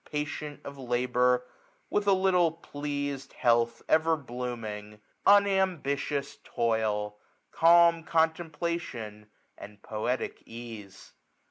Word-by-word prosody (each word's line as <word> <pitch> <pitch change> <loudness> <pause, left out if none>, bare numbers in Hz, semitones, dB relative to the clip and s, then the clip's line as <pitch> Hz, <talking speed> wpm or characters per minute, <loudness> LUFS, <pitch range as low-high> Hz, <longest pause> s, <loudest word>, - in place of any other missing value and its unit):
Patient 150 0 -4
of 140 0 -8
labour, 125 0 +1 0.5
with 205 0 0
a 200 - +6
little 185 -3 +3
pleas'd; 145 -3 -5
Health 115 0 +2
ever 160 +1 +3
blooming; 115 -5 -6 0.3
unambitious 185 -9 +2
toil; 110 -3 -1 0.2
' - - -41
Calm 170 0 +5
contemplation, 160 -10 -2 0.3
and 105 0 -11
poetic 115 +4 -3
ease. 115 -4 -10
140 Hz, 95 wpm, -29 LUFS, 115-165 Hz, 0.5 s, a